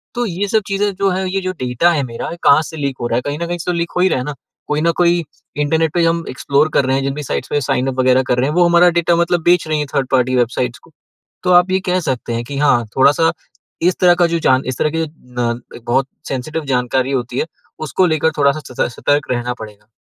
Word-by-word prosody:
तो 240 0 0
ये 200 0 -2
सब 220 +2 +2
चीज़ें, 200 0 0
जो 195 +1 +1
है, 190 +1 -1
ये 195 - 0
जो 185 0 -2
डेटा 130 +7 +2
है 150 -4 0
मेरा, 115 -3 -5
ये 170 - -7
कहाँ 140 +2 +6
से 160 +1 -9
लीक 140 -3 -3
हो 120 - -1
रहा 115 - -1
है? - - 0
कहीं 145 +1 -3
न 170 - -3
कहीं 175 0 -3
से 175 - -2
तो - - -2
लीक 170 0 -2
हो - - +2
ही 190 - +4
रहा - - 0
है 125 - -4
ना। 150 0 -5 0.3
कोई 150 0 0
न 170 +1 +3
कोई 175 -1 +3 0.3
इंटरनेट 155 +1 +1
पे 175 - +2
हम 165 0 +1
एक्सप्लोर 140 +4 +1
कर 140 - +3
रहे 130 0 +1
हैं, 135 - -1
जिन 135 0 -1
भी 150 +1 -5
साइट्स 130 - -3
पे 145 - 0
साइन 130 0 0
अप 130 -1 -3
वगैरह 130 0 +4
कर 125 - +2
रहे 130 +3 +1
हैं, 150 - -3
वो 175 0 +5
हमारा 175 +1 +5
डाटा, 170 0 +2
मतलब, 170 0 +1
बेच 175 -1 +3
रही 155 -1 0
हैं 150 - -2
थर्ड-पार्टी 130 -1 +1
वेबसाइट्स 120 0 -1
को। - - -20 0.5
तो 180 - +2
आप 180 +1 +5
ये 190 - +2
कह 180 0 +2
सकते 120 -2 -3
हैं 115 +1 -2
कि 140 +3 -6
हाँ, 130 -5 +3
थोड़ा-सा 145 +5 +4 0.5
इस 180 +2 +2
तरह 175 -1 +6
का, 175 0 +3
जो 170 0 -1
जान 130 -3 +2
इस 130 -1 -3
तरह 155 - +2
की 165 - 0
न, 125 -5 -4 0.3
बहुत 130 +3 +1 0.2
सेंसिटिव 150 +4 -4
जानकारी 130 0 0
होती 125 -1 -2
है, - - 0 0.4
उसको 185 +5 +1
लेकर 160 -1 +1
थोड़ा-सा 140 +1 +2 0.3
स - - -9
सतर्क 145 0 0
रहना 125 0 -1
पड़ेगा। 105 -2 -11
150 Hz, 265 wpm, -17 LUFS, 130-170 Hz, 0.5 s, कहाँ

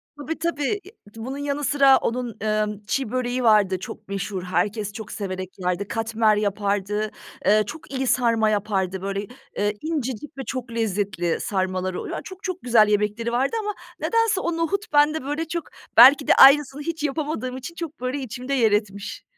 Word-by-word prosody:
Tabii, 300 +2 -5
tabii, 320 -4 -1
e, 390 - -13 0.2
bunun 255 +5 -6
yanı 285 0 -2
sıra 275 -1 +5
onun, 240 -1 -3
ııı, 215 -1 0
çi 260 -3 -1
böreği 255 0 -1
vardı 205 -4 +4
çok 190 - -9
meşhur, 195 -1 -4
herkes 205 +4 -1
çok 215 0 -8
severek 185 -2 -4
yerdi, 180 +2 -1
katmer 225 -1 +1
yapardı, 205 0 -1 0.3
eee, 215 +1 +5
çok 310 +2 -9
iyi 265 -1 -2
sarma 230 -3 +3
yapardı 195 -3 -1
böyle, 195 +1 -3 0.3
ııı, 205 0 +2
incecik 285 -4 -4
ve - - -4
çok 255 -2 -5
lezzetli 200 -6 -1
sarmaları 185 -1 -2
oluyo - - -5
Çok, 375 0 -11
çok 370 -1 -4
güzel 230 -3 +5
yemekleri 210 +3 0
vardı 265 - 0
ama 420 -1 -3 0.3
nedense 455 -4 +1
o 340 -1 -2
nohut 370 +2 -2
bende 295 0 +4
böyle 295 +3 -3
çok, 340 0 -3 0.3
belki 275 +4 +8
de - - +6
aynısını 280 +1 +7
hiç 320 0 -4
yapamadığım 285 -4 -2
için 300 +6 -8
çok, 330 -4 -6
böyle, 255 +3 -2
içimde 255 +1 -5
yer 230 -6 +3
etmiş. 205 -1 -2
235 Hz, 170 wpm, -23 LUFS, 205-285 Hz, 0.3 s, belki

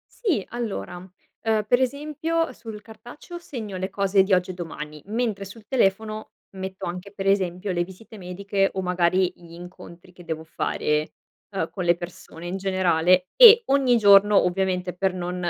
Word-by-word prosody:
Sì. 370 - 0
Allora, 230 -6 -5
uhm, 205 +4 -4
per 245 +3 +4
esempio 300 +5 -1
sul 225 -4 -10
cartaceo 240 - -11
segno 225 - -7
le 190 +1 -4
cose 195 -1 +3
di 195 +1 0
oggi 180 0 +2
e - - -8
domani, 155 -3 -8
mentre 215 -2 -2
sul 210 +3 -12
telefono 215 -2 0 0.2
metto 190 0 -6
anche, 180 +3 -6
per 195 -1 -4
esempio, 190 0 0
le 175 -1 0
visite 190 +5 -13
mediche 195 +1 -1
o 190 - -2
magari 180 0 +1
gli 170 -1 -16
incontri 175 0 -12
che 180 0 -15
devo 160 -1 -4
fare, 150 -1 -1 0.4
uhm, 190 -5 -2
con 185 - -5
le 170 0 +4
persone 175 -1 -9
in 185 +2 -3
generale, 185 -2 +2
e 470 -1 +10
ogni 265 -3 +3
giorno, 205 0 +6
ovviamente, 180 0 -1
per 190 0 0
non 180 0 -4
190 Hz, 165 wpm, -24 LUFS, 180-215 Hz, 0.4 s, e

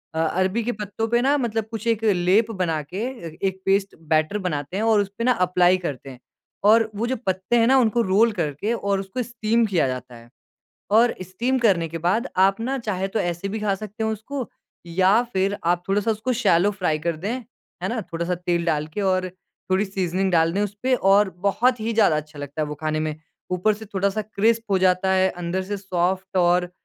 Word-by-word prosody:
अ, - - -1
अरबी 185 +7 0
के 240 - -1
पत्तों 210 +1 -4
पे 240 +1 +2
ना 280 +3 +3
मतलब 225 -4 -1
कुछ 225 -1 -5
एक 225 -1 +1
लेप 205 +2 +3
बना 175 -6 -1
के 150 +6 -9 0.5
एक 190 0 -4
पेस्ट 195 0 +1
बैटर 155 +5 +2
बनाते 175 -2 -3
हैं 215 - -1
और 225 -2 +4
उसपे 200 +3 -5
ना 250 0 +3
एप्लाई 180 0 +4
करते 145 -7 -6
हैं। 130 -2 -11 0.5
और 220 +1 +5
वो 225 +4 -1
जो 260 - 0
पत्ते 190 +4 0
हैं 230 - +4
ना 265 +2 +5
उनको 235 -2 +3
रोल 220 +3 +3
करके 175 +3 -2
और 200 -4 -1
उसको 195 +6 -4
स्टीम 230 -1 0
किया 180 -9 +1
जाता 125 -1 -6
है। 115 0 -15 0.6
और 230 +3 +5
स्टीम 225 +9 -1
करने 190 -8 +2
के 165 - -5
बाद 185 - 0
आप 195 +2 +4
ना 265 +4 -1
चाहे 195 -5 -2
तो 195 - -2
ऐसे 175 +2 -2
भी 220 +2 -3
खा 205 -2 0
सकते 215 +2 -6
हो 220 - 0
उसको। 240 +4 -5 0.4
या 190 +6 +3
फ़िर 195 +2 0
आप 175 +1 +1
थोड़ा 195 +2 +2
सा 225 - +1
उसको 220 +4 -1
शैलो 205 -5 +3
फ्राई 180 -6 -1
कर 170 +1 -1
दें, 200 +8 -3 0.5
है - - 0
ना? 230 -1 -2
थोड़ा 170 -3 -5
सा 180 +1 -1
तेल 175 -1 -1
डाल 155 -2 0
के 165 +6 -5
और 185 -1 +1 0.4
थोड़ी 190 +3 +2
सीज़निंग 190 -1 -1
डाल 165 -1 +3
दें 200 - 0
उसपे 210 +6 -1
और 200 -2 +4 0.2
बहुत 245 +5 +2
ही 225 +1 -2
ज़्यादा 210 -8 +4
अच्छा 150 0 -7
लगता 145 +2 -5
है - - +1
वो 150 - -5
खाने 155 0 -2
में। 155 -1 -2 0.4
ऊपर 180 +4 +2
से 215 +1 -9
थोड़ा 200 +1 +1
सा 215 +2 -2
क्रिस्प 220 +2 +1
हो 195 - +4
जाता 185 0 +2
है, 190 0 +3
अंदर 180 +1 -3
से 205 +2 -4
सॉफ्ट 185 0 -1
और 180 0 +2
195 Hz, 220 wpm, -23 LUFS, 175-220 Hz, 0.6 s, और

